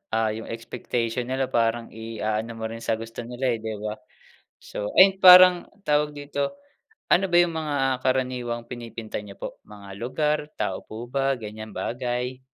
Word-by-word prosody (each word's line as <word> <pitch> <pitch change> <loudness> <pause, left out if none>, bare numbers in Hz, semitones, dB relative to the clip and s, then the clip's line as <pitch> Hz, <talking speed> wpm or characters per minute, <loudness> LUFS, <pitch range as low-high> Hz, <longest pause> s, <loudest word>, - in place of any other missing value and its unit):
ah, 110 -1 +2
yung 110 +1 -6
expectation 115 +1 -3
nila 130 0 -1
parang 115 0 +1
iaano 110 0 -3
mo 115 - -7
rin 115 +1 -4
sa 115 0 0
gusto 115 +1 -8
nila 125 +1 -1
eh, 115 - -2
'di 110 0 -4
ba? 105 0 -4 0.6
So, 105 - -5
ayun 190 0 +7
parang 180 -1 +9 0.2
tawag 150 -2 +1
dito, 145 -1 -3 0.6
ano 195 - +4
ba 175 - +1
yung 175 -1 +1
mga 140 -4 0
karaniwang 125 -2 -1
pinipinta 115 -2 -6
niyo 105 -1 -10
po, - - -6
mga 100 -1 -12
lugar 150 +6 0 0.2
tao - - -2
po 115 +2 -8
ba 135 +1 +1
ganiyang 110 -1 -8
bagay? 125 +2 -3
120 Hz, 165 wpm, -25 LUFS, 110-135 Hz, 0.6 s, parang